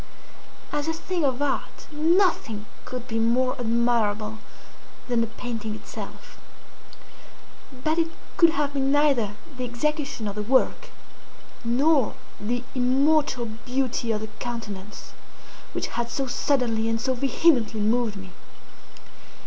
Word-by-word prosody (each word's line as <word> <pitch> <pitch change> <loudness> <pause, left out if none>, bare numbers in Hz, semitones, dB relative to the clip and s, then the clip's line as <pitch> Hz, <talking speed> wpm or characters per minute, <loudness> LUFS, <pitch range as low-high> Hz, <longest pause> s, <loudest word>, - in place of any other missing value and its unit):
As 295 +1 -1
a 325 - +1
thing 345 +1 -2
of 270 0 +1
art 280 -2 -2
nothing 310 - +2 0.2
could 250 -1 -6
be 225 -2 -1
more 250 +3 +2
admirable 225 -2 +1 0.7
than 240 -2 +2
the 230 - +1
painting 225 -2 -4
itself. - - -9 1.4
But 315 +2 +2
it 330 - +3 0.3
could 335 - +7
have 290 -2 0
been 270 -1 +1
neither 275 -8 +3 0.2
the 255 - -4
execution 250 -1 -1
of 200 - -2
the 210 - -3
work, 260 - +2 0.7
nor 265 +2 +3 0.2
the 240 +4 -1
immortal 265 +1 +3
beauty 240 +1 -1
of 215 -1 -1
the 220 - -5
countenance, 215 -4 -6 0.6
which - - -2
had 235 0 -2
so 270 +3 -1
suddenly 245 -3 +1
and 225 0 +1
so 260 +3 +1
vehemently 255 -3 +3
moved 220 +1 +2
me. 190 -2 -9
245 Hz, 125 wpm, -25 LUFS, 225-280 Hz, 1.4 s, could